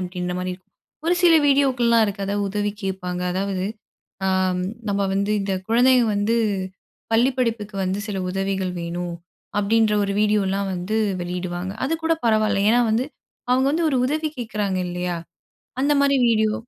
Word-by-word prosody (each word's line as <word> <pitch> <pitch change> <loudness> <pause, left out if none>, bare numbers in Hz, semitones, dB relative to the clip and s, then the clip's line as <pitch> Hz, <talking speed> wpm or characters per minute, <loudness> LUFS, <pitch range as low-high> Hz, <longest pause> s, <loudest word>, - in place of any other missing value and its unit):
அப்பிடின்றமாரி 180 0 -3
இருக்கும். 185 0 -22 0.4
ஒரு 350 - +4
சில 345 -2 +7
வீடியோக்கள்லாம் 255 -5 +4
இருக்கு 200 0 -3
அதா 200 - -1
உதவி 205 +1 -1
கேப்பாங்க. 180 -2 -3
அதாவது, 190 0 -2 0.6
ஆம் 185 -1 +1 0.3
நம்ம 200 -1 +1
வந்து, 200 +1 0
இந்த 195 -1 -1
குழந்தைக 250 +2 +5
வந்து, 205 +3 +1 0.8
"பள்ளி 240 +4 +4
படிப்புக்கு 225 -4 -1
வந்து 185 +2 -1
சில 195 -2 -2
உதவிகள் 195 -1 -1
வேணும்"அப்பிடின்ற 180 +5 -1
ஒரு 200 - -1
வீடியோ 210 -1 +3
எல்லாம் 195 0 -1
வந்து 185 +5 -2 0.2
வெளியிடுவாங்க. 180 +1 -4
அது 325 - 0
கூட 330 - +3
பரவால்ல. 215 -3 +2
ஏன்னா, 240 +2 +4
வந்து 235 +5 +1 0.4
அவுங்க 260 +1 +3
வந்து 325 +1 +1
ஒரு 270 - +1
உதவி 310 +3 -1
கேக்கிறாங்க 210 -5 -2
இல்லயா! 180 0 -3 0.7
அந்தமாரி 280 -1 +3
வீடியோ. 220 -1 +2
200 Hz, 145 wpm, -22 LUFS, 185-235 Hz, 0.8 s, சில